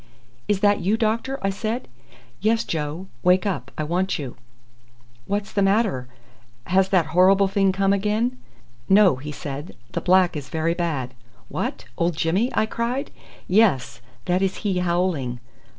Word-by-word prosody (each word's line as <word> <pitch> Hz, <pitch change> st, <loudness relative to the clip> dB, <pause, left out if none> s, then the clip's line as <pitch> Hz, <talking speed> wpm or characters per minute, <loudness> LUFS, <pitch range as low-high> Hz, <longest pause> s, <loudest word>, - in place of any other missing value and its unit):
"Is 200 Hz, -2 st, +1 dB
that 205 Hz, 0 st, +4 dB
you, 200 Hz, +5 st, +1 dB
doctor?" 230 Hz, +4 st, 0 dB
I 195 Hz, -, +1 dB
said. 220 Hz, +5 st, -3 dB, 0.5 s
"Yes, 225 Hz, +2 st, +2 dB
Joe; 155 Hz, +3 st, -3 dB, 0.2 s
wake 180 Hz, +2 st, +3 dB
up. 140 Hz, -, -2 dB
I 155 Hz, -, -1 dB
want 180 Hz, +5 st, 0 dB
you." 135 Hz, -6 st, -6 dB, 0.9 s
"What's 200 Hz, 0 st, -2 dB
the 200 Hz, -, +1 dB
matter 195 Hz, -, +2 dB, 0.6 s
has 190 Hz, +1 st, +2 dB
that 185 Hz, -5 st, +3 dB
horrible 190 Hz, +2 st, +5 dB
thing 195 Hz, 0 st, +2 dB
come 195 Hz, +1 st, +2 dB
again?" 215 Hz, +5 st, 0 dB, 0.5 s
"No," 195 Hz, -7 st, +6 dB
he 145 Hz, +3 st, -7 dB
said; 145 Hz, +1 st, -7 dB, 0.2 s
"the -, -, -3 dB
black 185 Hz, -1 st, +4 dB
is 140 Hz, -3 st, -6 dB
very 160 Hz, +1 st, 0 dB
bad." 155 Hz, -8 st, -2 dB, 0.4 s
"What! -, -, -3 dB
old 170 Hz, -1 st, +1 dB
Jimmy?" 185 Hz, +10 st, +1 dB
I -, -, +3 dB
cried. 235 Hz, +4 st, -3 dB, 0.4 s
"Yes. 190 Hz, -, +2 dB, 0.2 s
That 180 Hz, +1 st, +1 dB
is 190 Hz, -1 st, 0 dB
he 190 Hz, -3 st, +1 dB
howling." 170 Hz, -8 st, 0 dB
190 Hz, 150 wpm, -23 LUFS, 165-205 Hz, 0.9 s, No